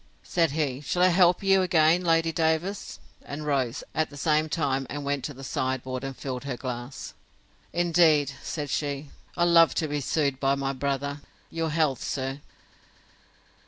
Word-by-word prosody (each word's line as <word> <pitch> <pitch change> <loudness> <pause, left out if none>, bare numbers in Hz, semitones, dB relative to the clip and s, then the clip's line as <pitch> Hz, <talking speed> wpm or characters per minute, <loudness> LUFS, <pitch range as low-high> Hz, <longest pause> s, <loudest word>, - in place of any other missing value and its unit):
Said 170 -2 +1
he, 145 -4 -1
Shall 180 +5 0
I 185 - +6
help 180 +1 +4
you 195 -1 +4
again, 170 -1 +3
Lady 165 -1 +2
Davers?—and 160 -2 -3
rose, 135 -5 -1
at 155 0 0
the 145 - -11
same 155 +1 +1
time, 135 -5 -1
and 145 0 -5
went 140 -2 -1
to 145 - -5
the 135 - -10
sideboard, 130 0 -2
and 135 -1 -5
filled 130 -2 -5
her 140 - -2
a - - -13
glass. 125 +1 -6 0.6
Indeed, 165 -5 +3
said 145 -4 -4
she, 145 -1 -3 0.3
I 175 - +3
love 170 -1 +5
to 160 - 0
be 145 0 -2
soothed 140 -1 0
by 135 0 +2
my 135 0 -2
brother!—Your 140 +4 -4
health, 150 -5 0
sir! 135 +1 -3
145 Hz, 160 wpm, -26 LUFS, 135-165 Hz, 0.6 s, I